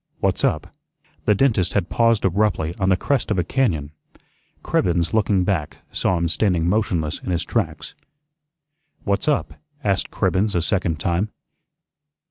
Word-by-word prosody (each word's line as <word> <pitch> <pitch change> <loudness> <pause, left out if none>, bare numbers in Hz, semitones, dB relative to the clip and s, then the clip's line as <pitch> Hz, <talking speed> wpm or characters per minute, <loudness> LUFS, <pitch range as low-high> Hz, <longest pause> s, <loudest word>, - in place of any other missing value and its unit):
"What's - - 0
up?" - - 0 0.5
The 105 - +4
dentist 110 -7 +2
had 100 -4 0
paused 115 -3 +2
abruptly 95 -4 +1
on 95 -1 +2
the 95 - +4
crest 140 +5 0
of 105 - 0
a 90 - +2
cañón. 85 - 0 0.7
Cribbens, 85 0 +1
looking 105 -3 +2
back, 85 -6 -1
saw 90 - +1
him 85 0 0
standing 85 -1 +1
motionless 90 -6 0
in - - -7
his 85 -3 0
tracks. - - -2 1.1
"What's 100 +7 0
up?" 150 -2 +1 0.3
asked 100 -3 0
Cribbens 100 +2 0
a 85 - +2
second 85 -5 0
time. 85 +6 0
95 Hz, 145 wpm, -22 LUFS, 85-105 Hz, 1.1 s, The